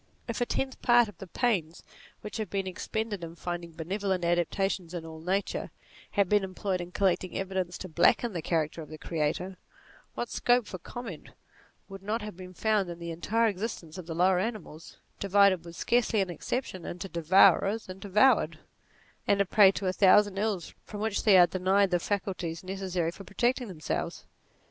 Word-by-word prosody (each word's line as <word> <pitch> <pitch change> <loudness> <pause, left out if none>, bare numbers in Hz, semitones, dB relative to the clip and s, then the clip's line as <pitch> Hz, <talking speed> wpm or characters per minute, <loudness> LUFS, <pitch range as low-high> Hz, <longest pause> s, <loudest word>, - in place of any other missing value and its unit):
If 230 0 -3
a 245 - +1
tenth 265 -1 -2
part 240 -1 +5
of 205 - -13
the 195 - -8
pains 180 -7 -1 0.4
which 210 - -6
have 215 -4 -3
been 195 +1 -2
expended 205 +1 -4
in 165 0 -7
finding 175 -1 -5
benevolent 185 +2 -2
adaptations 175 +1 0
in 165 -2 -5
all 160 -1 -9
nature, 190 +4 -1 0.4
had 200 -3 +2
been 205 +1 +3
employed 185 0 -2
in 175 0 -8
collecting 185 -1 0
evidence 190 -2 -2
to 185 - -7
blacken 185 +7 +3
the 170 - -3
character 160 0 -1
of 150 - -10
the 155 - -8
Creator, 165 +4 -2 0.6
what 240 - -4
scope 245 -1 +2
for 185 -1 -7
comment 200 -3 -8 0.6
would 195 0 -10
not 210 +3 -2
have 210 -3 -7
been 185 0 -11
found 210 -3 +1
in 170 - -6
the 170 0 -6
entire 200 +8 +1
existence 190 -5 -4
of 170 - -9
the 165 - -4
lower 180 +1 +3
animals, 185 -7 -5 0.2
divided, 200 -2 +4
with 170 0 -10
scarcely 235 +2 +1
an 190 -2 0
exception, 185 - -4
into 175 +3 -6
devourers 190 +5 +4
and 185 +1 -9
devoured, 210 +7 +3 0.7
and 200 - +3
a 200 - +4
prey 195 +1 +6
to 195 - -4
a 185 - +1
thousand 200 +1 +5
ills 205 -5 -2
from 205 - -8
which 215 -1 -1
they 205 -3 +7
are 175 - +9
denied 190 +2 +2
the 175 - +3
faculties 185 -4 -3
necessary 185 -3 -2
for 195 - -11
protecting 240 +6 0
themselves 160 -7 -4
190 Hz, 180 wpm, -29 LUFS, 175-205 Hz, 0.7 s, are